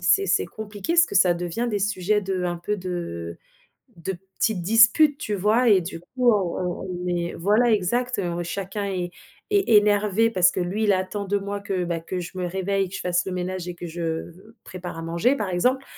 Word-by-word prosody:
c'est 395 0 +3
c'est 405 - +2
compliqué 210 - -5
parce 340 -1 +5
que - - -2
ça 180 -2 +5
devient 175 +7 -3
des 205 -3 -1
sujets 205 +1 +1
de 190 -2 -2
un 175 -1 -1
peu 205 +5 -3
de 170 - -5 0.6
de 170 +3 -4 0.3
petites 220 -6 +1
disputes, 225 - +5
tu 210 -8 -3
vois? 215 +5 +3
Et 195 -2 +6
du 165 -1 -6
coup 245 +7 +1
on 190 -5 0 0.2
on - - -6 0.2
on - - -4
est 175 -1 -2
voilà 215 +7 +3
exact, 240 +5 0
heu, 175 -2 -2
chacun 195 +4 -4
est 180 -2 -3 0.4
est 400 - +2
énervé 210 +1 +3
parce 180 -4 +4
que - - -5
lui 195 +5 -1
il 205 - +4
attend 190 +2 -2
de 200 +1 0
moi 200 +1 -4
que, 195 -3 -2
bah, 170 -1 -2
que 180 +3 -5
je 180 +2 -8
me 180 -1 -2
réveille, 190 +1 -1
que 190 - -6
je - - -6
fasse 180 0 0
le 190 - -3
ménage 180 0 -3
et 175 - -5
que 175 - -7
je 170 +1 -6 0.3
v 180 +3 -17 0.2
prépare 180 -1 -7
à - - -5
manger 170 +12 +1
par 205 -4 -3
exemple, 250 +10 +1
190 Hz, 220 wpm, -24 LUFS, 175-210 Hz, 0.6 s, Et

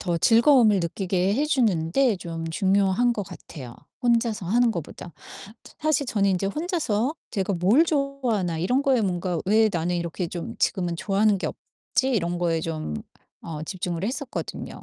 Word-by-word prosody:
더 175 -2 -1
즐거움을 230 - +5
느끼게 185 +2 0
해 285 - +1
주는 220 - +1
데 255 +1 +3
좀 165 -2 -6
중요한 195 +6 +2
것 205 -4 -3
같아요, 130 -7 -10 0.3
혼자서 230 -5 +1
하는 235 +4 +3
거보다. 170 -2 -7 0.5
사 - - -15
사실 305 -3 +1
저는 200 -4 +1
인제 190 +1 0
혼자서 305 - -1 0.2
제가 195 -2 -1
'뭘 205 - +4
좋아하나.' 265 - -1
이런 250 +10 +1
거에 265 -3 +3
뭔가 180 -3 -1
'왜 215 +3 +4
나는 175 0 -1
이렇게 170 +1 -3
좀 170 -1 -6
지금은 175 -2 0
좋아하는 200 +4 +2
게 - - -2
없지?' 265 0 -3
이런 175 -6 0
거에 165 -2 0
좀 155 - -4 0.5
어 155 -2 -6
집중을 175 0 -4
했었거든요. 255 +3 -5
195 Hz, 330 characters per minute, -25 LUFS, 175-245 Hz, 0.5 s, 즐거움을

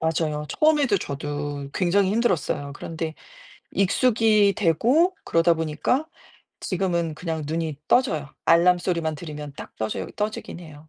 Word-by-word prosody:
맞아요. 155 -2 -1
처음에도 295 -8 +3
저도 145 -1 -4
굉장히 190 +2 +2
힘들었어요. 185 -10 0
그런데 160 0 -5 0.6
익숙이 215 0 +3
되고 245 - +3
그러다 165 +1 +3
보니까 165 - -1 0.5
지금은 170 -4 -1
그냥 160 -1 -4
눈이 160 -2 -3
떠져요. 155 - +1
알람 175 +2 +5
소리만 170 -3 -1
들으면 150 -2 -7
딱 - - -10
떠져요 110 -1 -3
떠지긴 210 -4 -4
해요. 155 -2 -13
165 Hz, 320 characters per minute, -24 LUFS, 155-200 Hz, 0.6 s, 알람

